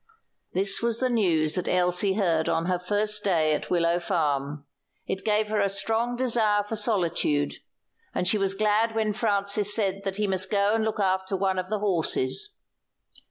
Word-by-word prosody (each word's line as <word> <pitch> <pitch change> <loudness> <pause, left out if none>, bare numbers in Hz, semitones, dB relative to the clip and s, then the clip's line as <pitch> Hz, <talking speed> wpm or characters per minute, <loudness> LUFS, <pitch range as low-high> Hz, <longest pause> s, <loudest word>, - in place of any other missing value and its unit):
This 195 +2 +2
was 230 -1 0
the 255 -1 0
news 165 -9 +1
that 180 - -2
Elsie 180 +2 +2
heard 170 -6 0
on 165 +1 0
her 180 0 -1
first 210 +3 0
day 160 -6 +2
at 150 - -4
Willow 170 -1 +1
Farm. 145 -5 -2 0.4
It 190 - -4
gave 215 0 +1
her 215 -1 0
a 200 - +1
strong 225 +4 -1
desire 225 -5 +1
for 205 +2 -5
solitude, 170 -9 0 0.5
and 180 - -2
she 210 +3 +3
was 195 0 -1
glad 215 +2 +1
when 215 -1 0
Francis 205 -2 +1
said 195 -3 0
that 195 -1 -4
he 210 - 0
must 190 -1 0
go 200 0 +2
and 225 0 +1
look 220 -1 -2
after 190 0 0
one 190 -1 0
of 185 0 -5
the 215 - -1
horses. 200 - +1
195 Hz, 180 wpm, -25 LUFS, 180-215 Hz, 0.5 s, she